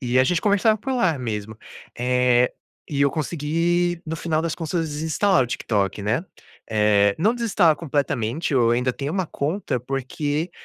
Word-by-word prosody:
e 125 -1 +1
a 130 - +5
gente 165 +5 +1
conversava 210 +1 +3
por 265 +5 -3
lá 185 - +1
mesmo. 110 -3 -4 0.4
Eh, 125 0 +3 0.4
e 140 -2 -2
eu 140 - +4
consegui 165 +3 0
no 160 - -3
final 160 -1 -1
das 165 0 -2
contas 165 0 -2
desinstalar 160 +4 +1
o - - -2
TikTok, 105 -5 -1
né, 115 - 0 0.5
eh, 105 -2 +3
não 215 +8 +2
desinstalar 205 -9 +3
completamente, 140 -2 -1
eu 120 -3 +4
ainda 125 +2 +1
tenho 140 +4 -4
uma 190 -2 -1
conta, 150 -1 -2
porque 145 +5 -3
145 Hz, 165 wpm, -23 LUFS, 125-170 Hz, 0.5 s, a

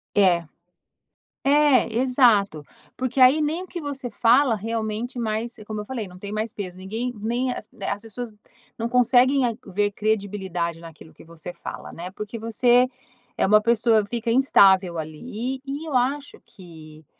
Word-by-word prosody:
É. 180 -4 +4 1.0
É, 280 -5 +4
exato. 230 - +3 0.3
Porque 255 +1 -3
aí 260 +4 +6
nem 315 +4 -1
o 370 - -12
que 345 - -6
você 275 -4 -5
fala 240 +3 +3
realmente 225 +3 -4
mais 225 +1 -2
como 215 -1 -4
eu - - -9
falei, 230 -3 -5
não 180 0 -13
tem 200 +2 -8
mais 215 +1 -3
peso. 185 -3 -7
Ninguém 220 +6 -4
nem 240 +4 -1
as - - -7
as 200 +1 -3
pessoas 225 0 -7 0.4
não 230 +1 -2
conseguem 250 +2 +4 0.3
ver 205 +2 0
credibilidade 195 -5 -2
naquilo 165 -1 -13
que - - -16
você 165 +1 -8
fala, - - -8
né, 175 +2 -7
porque 210 +3 -7
você 240 +3 +3 0.5
é - - +2
uma 210 +2 +6
pessoa, 225 -2 +3
fica 230 +1 -3
instável 195 -9 +4
ali 215 +11 -5
e 280 +3 -5
e - - -8
eu 300 -5 -4
acho 275 +3 -2
que 160 -5 -14
225 Hz, 160 wpm, -23 LUFS, 195-250 Hz, 1.0 s, aí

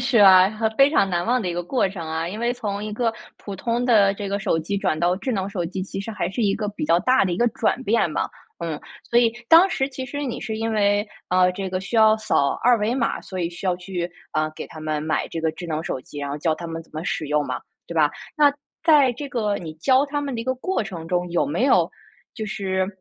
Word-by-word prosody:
是 245 -1 +2
啊， 190 -1 +8
和 220 +1 0
非 275 +1 +6
常 195 - +3
难 175 -2 0
忘 250 +2 +2
的 185 - -2
一 170 - -2
个 175 - -2
过 195 +1 +1
程 175 -4 -7
啊， 160 +1 -2
因 210 +5 -6
为 240 +1 +1
从 210 -4 -4
一 215 - -5
个 230 +1 0 0.2
普 200 - -8
通 235 +5 -1
的 205 -5 +5
这 200 -1 -5
个 200 +1 -1
手 180 -4 0
机 185 +6 -2
转 155 -5 0
到 175 +2 +2
智 255 - -3
能 195 -2 -1
手 180 -4 -3
机， 185 +2 -4
其 195 - -5
实 210 +3 -5
还 195 -5 -2
是 225 +4 -2
一 200 -1 +2
个 210 -2 -3
比 205 -6 -4
较 165 +2 +4
大 255 0 +3
的 180 - 0
一 - - -1
个 240 +5 +2
转 245 +3 -1
变 200 -7 +2
吧。 - - -1 0.3
嗯， 165 -3 -3 0.3
所 235 - +4
以 230 -2 +4 0.2
当 340 +4 +8
时 270 +1 0
其 260 -1 -6
实 285 +2 -5
你 245 - -4
是 220 -1 -4
因 225 0 -1
为， 205 0 +2 0.2
呃， 180 0 +4
这 190 0 -4
个 185 0 -2
需 215 +4 -4
要 220 0 +6
扫 140 -10 +1
二 245 0 +5
维 215 +4 0
码， 245 -3 0
所 185 - -7
以 170 - 0
需 175 +2 -10
要 185 -2 +2
去， 180 -1 -4 0.2
啊， 155 0 0
给 - - -7
他 155 - -11
们 155 -1 -2
买 160 0 -1
这 165 - -4
个 160 - +1
智 175 +2 -8
能 155 0 -2
手 - - -3
机， 145 - -11
然 140 - -3
后 140 - -3
教 155 +1 0
他 170 - -7
们 165 0 -5
怎 - - -26
么 155 +1 -5
使 155 - -2
用 150 -1 +1
嘛， 130 - -3 0.3
对 170 - -7
吧？ 150 -2 +4 0.3
那 290 -2 +5 0.3
在 290 -6 +6
这 285 +4 -6
个 210 -5 0
你 160 -3 -6
教 260 - +3
他 290 0 -2
们 280 -3 -3
的 230 - -3
一 - - -11
个 260 0 0
过 370 +3 -1
程 170 -6 -7
中， 180 0 -1
有 175 - +1
没 170 - 0
有 275 - +4 0.4
就 220 - -4
是 190 -4 -1
200 Hz, 295 characters per minute, -23 LUFS, 170-235 Hz, 0.4 s, 啊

